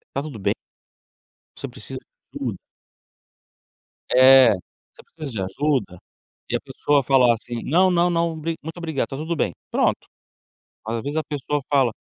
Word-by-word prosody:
"Está 140 Hz, -, 0 dB
tudo 145 Hz, -5 st, -7 dB
bem?". 100 Hz, -, 0 dB, 1.0 s
Você -, -, -6 dB
precisa -, -, -7 dB, 0.3 s
de -, -, -7 dB
ajuda? -, -, -2 dB, 1.5 s
É. 130 Hz, 0 st, +8 dB
"Você 90 Hz, -, -13 dB
precisa 155 Hz, -4 st, -6 dB
de 105 Hz, -, -3 dB
ajuda?" 135 Hz, -7 st, 0 dB, 0.5 s
e -, -, +2 dB
a -, -, -4 dB
pessoa 145 Hz, -1 st, +1 dB
falar 125 Hz, -2 st, +5 dB
assim: 120 Hz, +1 st, -6 dB
"Não, 185 Hz, +5 st, +4 dB
não 175 Hz, 0 st, +3 dB
não, 170 Hz, -1 st, 0 dB
bri 165 Hz, +2 st, -2 dB
muito 160 Hz, +3 st, -7 dB
obrigado, 160 Hz, -5 st, -2 dB
está 135 Hz, -, -7 dB
tudo 160 Hz, +4 st, -3 dB
bem". 100 Hz, -, 0 dB, 0.2 s
Pronto. -, -, +1 dB, 0.8 s
Às 115 Hz, +1 st, -2 dB
vezes 145 Hz, +5 st, -4 dB
a 160 Hz, -, 0 dB
pessoa 145 Hz, 0 st, -2 dB
fala: 135 Hz, -5 st, +3 dB
145 Hz, 160 wpm, -23 LUFS, 125-160 Hz, 1.5 s, É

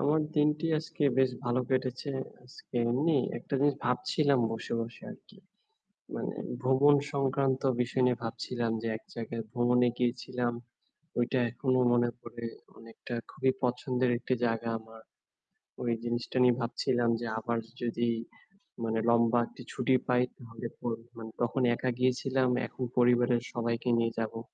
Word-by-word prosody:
আমার 155 Hz, +2 st, +3 dB, 0.2 s
দিনটি 150 Hz, +2 st, +3 dB
আজকে 160 Hz, 0 st, -6 dB, 0.2 s
বেশ 130 Hz, -1 st, +4 dB
ভাল 120 Hz, -1 st, 0 dB
কেটেছে। 130 Hz, +1 st, -1 dB, 0.3 s
আজকে 125 Hz, +1 st, -16 dB, 0.2 s
এমনি 145 Hz, +6 st, +2 dB, 0.2 s
একটা -, -, -6 dB
জিনিস 145 Hz, 0 st, +4 dB
ভাবছিলাম 135 Hz, +2 st, +2 dB
বসে, 115 Hz, -, -5 dB
বসে 115 Hz, 0 st, -6 dB
আরকি। 205 Hz, -, -14 dB, 0.8 s
মানে -, -, -3 dB, 0.3 s
ভ্রমণ 135 Hz, +3 st, +5 dB, 0.2 s
সংক্রান্ত 135 Hz, -1 st, +1 dB, 0.2 s
বিষয় 125 Hz, +1 st, +1 dB
নিয়ে 125 Hz, -1 st, +1 dB
ভাবছিলাম 115 Hz, 0 st, -2 dB
যে 115 Hz, -, -2 dB
এক -, -, -21 dB
জায়গায় 115 Hz, -1 st, -4 dB
ভ্রমণে 125 Hz, 0 st, +3 dB
গিয়েছিলাম। 125 Hz, 0 st, -1 dB, 0.7 s
ঐটা 120 Hz, +2 st, +2 dB
এখনো 130 Hz, +1 st, +1 dB
মনে 120 Hz, 0 st, +3 dB
পড়ে 120 Hz, 0 st, -7 dB, 0.3 s
অনেকটা 115 Hz, +2 st, -8 dB, 0.2 s
খুবই 130 Hz, -, +1 dB
পছন্দের 125 Hz, 0 st, +1 dB
একটি 130 Hz, -, 0 dB
জায়গা 115 Hz, 0 st, 0 dB
আমার। 110 Hz, 0 st, -14 dB, 0.8 s
ওই 120 Hz, -, 0 dB
জিনিসটা 120 Hz, +2 st, -2 dB
নিয়ে 125 Hz, -1 st, +5 dB
ভাবছিলাম 120 Hz, 0 st, +1 dB
যে 120 Hz, -, -4 dB
আবার 115 Hz, +1 st, -1 dB
য -, -, -21 dB
যদি 120 Hz, 0 st, 0 dB, 0.8 s
মানে 115 Hz, 0 st, 0 dB
লম্বা 115 Hz, 0 st, +4 dB
একটি -, -, -13 dB
ছুটি 130 Hz, -, +2 dB
পাই 125 Hz, -1 st, +4 dB, 0.2 s
তাহলে 115 Hz, -1 st, -7 dB
তো -, -, -13 dB, 0.3 s
মানে 110 Hz, -1 st, -7 dB
তখন 120 Hz, +3 st, +1 dB
একা 130 Hz, -, -1 dB
গিয়েছিলাম, 130 Hz, +1 st, +2 dB, 0.2 s
এখন 130 Hz, -, -6 dB
পরিবারের 120 Hz, 0 st, +4 dB
সবাইকে 115 Hz, 0 st, -1 dB
নিয়ে 115 Hz, 0 st, +2 dB
যাবো। 115 Hz, 0 st, -2 dB
125 Hz, 145 wpm, -30 LUFS, 120-130 Hz, 0.8 s, ভ্রমণ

